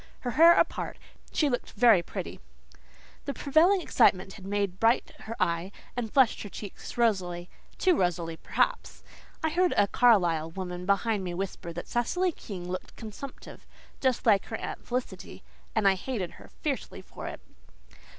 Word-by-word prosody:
Her 245 - -2
hair 335 +6 +8
apart, - - 0 0.3
she 300 - +2
looked 245 -3 -2
very 225 -4 +6
pretty. - - -6 0.9
The 280 - -3
prevailing 335 +7 +4
excitement 190 - +3
had 195 -2 -10
made 200 -2 -1
bright 225 +2 +3
her 225 +1 -5
eye 170 +3 0 0.2
and 235 -3 -3
flushed 265 -4 +4
her 205 - -6
cheeks 205 +3 -9
rosily 180 -7 0 0.3
too 370 -2 +3
rosily, 170 - 0
perhaps. - - -1 0.4
I 320 - +2
heard 355 +2 +2
a 205 - +6
Carlisle 175 -10 +3
woman 180 -1 -5
behind 200 +1 +1
me 175 -1 -4
whisper 185 -2 -4
that 175 - -6
Cecily 355 +10 0
King 185 - -8
looked 185 +1 -6
consumptive, 225 +5 -10 0.3
just 260 -3 0
like 205 -4 +4
her 225 - -5
Aunt - - -6
Felicity; 250 +1 -5 0.3
and 215 -3 +3
I 195 - +6
hated 190 -2 -4
her - - -14 0.2
fiercely - - -3
for - - -9
it. - - -6
210 Hz, 160 wpm, -28 LUFS, 185-250 Hz, 0.9 s, hair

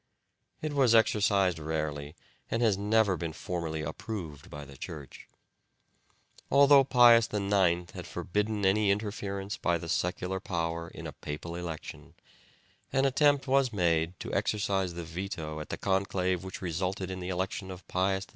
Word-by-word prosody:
It 155 -1 -2
was 130 -5 +4
exercised 100 -5 +3
rarely 75 -1 -3 0.3
and 115 +1 0
has 110 -4 +4
never 105 0 +2
been 85 -2 -4
formally 80 -3 -4
approved 80 -2 -6
by 75 0 -8
the 70 0 -13
Church. 70 0 -9 1.2
Although 140 0 +7
Pius 120 -3 +6
IX 95 -4 +1
had - - -8
forbidden 105 +1 -1
any 100 +2 +3
interference 100 -1 -2
by 85 0 +1
the 85 - -7
secular 90 +3 -1
power 85 -3 -3
in - - -10
a - - -4
papal 80 +3 -6
election, 85 -3 -7 0.8
an 135 +1 +2
attempt 145 +1 +3
was 135 -2 +3
made 85 -3 +1
to - - -5
exercise 95 -4 0
the 85 - -5
veto 80 -2 -5
at 75 - -7
the - - -3
conclave 95 -2 0
which 95 0 -7
resulted 95 +2 -2
in 95 - -5
the 90 0 -5
election 95 +2 -3
of 90 0 -9
Pius 95 +1 0
X. - - -30
95 Hz, 155 wpm, -30 LUFS, 85-105 Hz, 1.2 s, Although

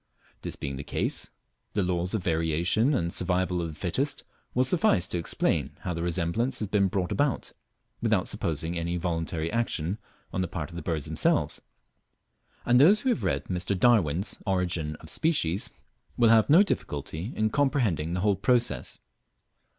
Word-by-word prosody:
This - - -4
being 70 -1 -5
case, - - -2 0.4
the 100 - +1
laws 90 +2 -1
of 105 - -2
Variation 85 - +1
and 85 -6 -1
Survival 90 0 +1
of 85 - -2
the 80 - -8
Fittest, 130 - -2 0.3
will 125 - +4
suffice 130 - +3
to 85 - -3
explain 85 - -1
how 90 - -3
the 85 - -4
resemblance 85 +8 0
has 105 - -1
been 100 -1 +2
brought 90 -1 -2
about, 145 -3 0 0.5
without - - +1
supposing 80 +2 -2
any 85 +1 -2
voluntary 80 -2 -2
action 105 -5 -1 0.3
on 95 - 0
the 90 - -1
part 85 -1 -5
of - - -10
the 85 - -5
birds 80 -2 -2
themselves; - - +1 1.0
and 120 +1 +5
those 195 +10 +6
who 265 - 0
have 240 - 0
read 70 0 0
Mr. 90 +1 -1
Darwin's 95 -7 +2
"Origin 90 -5 0
of 80 - -13
Species" 105 - 0 0.5
will 115 -2 +5
have 110 +1 +5
no 170 +7 +8
difficulty 80 - -3
in 110 0 +1
comprehending 115 - +1
the 90 - -1
whole 100 0 +3
process. 120 +5 +1
90 Hz, 165 wpm, -27 LUFS, 85-115 Hz, 1.0 s, no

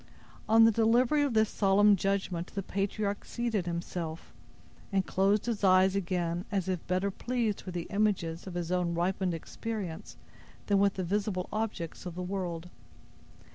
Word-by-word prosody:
On 225 +1 +7
the 225 - +7
delivery 235 +6 +3
of 280 -5 0
this 220 0 +4
solemn 205 +1 +4
judgment, 190 -2 -1
the 195 - -2
patriarch 200 +2 -2
seated 225 -7 -2
himself, 170 -1 -5 0.6
and 195 -2 +1
closed 195 +2 +2
his 230 -4 -2
eyes 190 0 +5
again, 175 -2 -1
as 195 -3 -1
if 185 -3 -3
better 185 +2 0
pleased 230 0 -1
with 185 -2 -6
the 170 - -2
images 195 -5 0
of 180 - -7
his 175 -1 -3
own 180 -2 0
ripened 180 +1 0
experience 195 0 -6 0.5
than 200 -1 +3
with 200 0 +3
the 185 - -2
visible 195 0 -1
objects 215 -6 -3
of 175 - -7
the 180 - -4
world. 180 -3 -4
195 Hz, 160 wpm, -30 LUFS, 175-210 Hz, 0.6 s, On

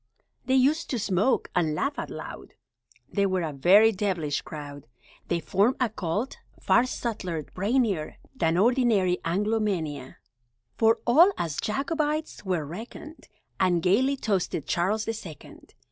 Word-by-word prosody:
They 260 - +2
used 280 +5 +2
to 250 - -1
smoke 205 +3 0
(!) - - -29
and 160 -4 +1
laugh 280 - -2
out - - -5
loud - - -9 0.3
(!) - - -33
They 200 -1 +2
were 185 -2 0
a 155 -2 -3
very 195 +10 +6
devilish 180 -8 -1
crowd! 145 -3 -9 0.4
They 170 - 0
formed 200 +9 +2
a 250 -3 +1
Cult, 205 +4 -3 0.2
far 255 - +3
subtler, 185 -11 -4
brainier, 200 - -1 0.2
Than 165 -7 +1
ordinary 215 -5 +3
Anglomania, 180 - -1 0.6
For 225 0 +4
all 330 +11 +6
as 160 -4 -3
Jacobites 300 +5 -2
were 180 -6 -1
reckoned, 230 - -9 0.3
And 175 -3 +2
gaily 260 +10 +3
toasted 190 - -1
Charles 205 +8 0
the 225 - -2
Second! 185 -9 -11
200 Hz, 145 wpm, -26 LUFS, 170-240 Hz, 0.6 s, very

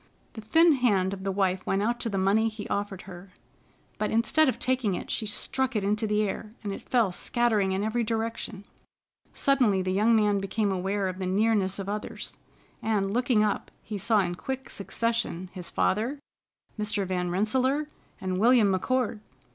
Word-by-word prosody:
The 220 - -7
thin 325 +10 +5
hand 205 -9 +2
of 190 -1 -7
the 195 - -1
wife 190 -1 0
went 195 +1 +1
out 240 +2 0
to 230 - -2
the 200 - -2
money 205 +4 +3
he 215 -1 -7
offered 200 -2 -3
her, 185 0 -11 0.7
but 215 - 0
instead 260 +7 +3
of 240 - -2
taking 250 -5 0
it, - - -5
she 215 - -1
struck 260 +4 -1
it 210 - +1
into 210 +2 0
the 210 0 +2
air, 215 +2 -5
and 200 -1 -3
it - - -10
fell 230 -6 +3
scattering 215 -1 +1
in 190 +1 0
every 225 +2 0
direction. 225 -2 -3 0.7
Suddenly 245 -9 +2
the 185 - -1
young 215 +4 +4
man 210 -2 +3
became 200 +1 -1
aware 190 +1 -1
of 185 0 -5
the 185 - -2
nearness 200 -1 +2
of 195 -1 -5
others, 210 +1 -5 0.4
and, 200 -3 0
looking 245 -2 +3
up, 210 -1 -1
he 210 -2 -5
saw 215 +1 +3
in 175 -2 -1
quick 265 +8 -5
succession 210 -4 -2
his 180 -2 -6
father, 230 +9 0 0.6
Mr. 210 -1 -1
Van 180 -1 -1
Rensselaer, 260 +10 +1 0.3
and 185 -1 -2
William 230 -1 +5
McCord! 225 +4 0
210 Hz, 180 wpm, -27 LUFS, 195-230 Hz, 0.7 s, thin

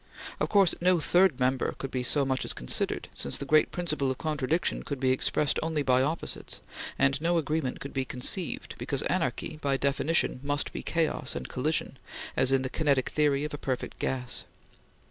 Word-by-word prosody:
Of - - 0
course, 195 -4 +4
no 180 0 +4
third 175 -3 +3
member 130 +1 +1
could 135 - -5
be 130 - -1
so 140 +3 +3
much 130 -1 0
as - - -1
considered, - - 0
since 70 - -1
the 140 - -5
great 155 +2 +4
principle 155 -6 -1
of 130 - -2
contradiction 155 +1 0
could 140 -2 -5
be 130 -1 +2
expressed 145 +3 +1
only 155 -2 -1
by 130 -1 +3
opposites; 155 +5 -3 0.4
and 135 +1 +2
no 170 +1 +2
agreement 155 -4 -1
could 140 - -7
be 135 - 0
conceived, 130 +8 -1
because - - -2
anarchy, 155 - -1
by 140 -1 +1
definition, 140 +1 +1
must 145 +1 -1
be - - -4
chaos 160 -5 0
and - - -4
collision, 140 0 -2 0.4
as 130 0 +4
in 135 -1 +3
the 130 - -2
kinetic 140 -4 +1
theory 145 -2 +2
of 150 - -4
a 145 - -5
perfect 130 -2 -3
gas. 125 -2 -2
140 Hz, 185 wpm, -28 LUFS, 130-155 Hz, 0.4 s, course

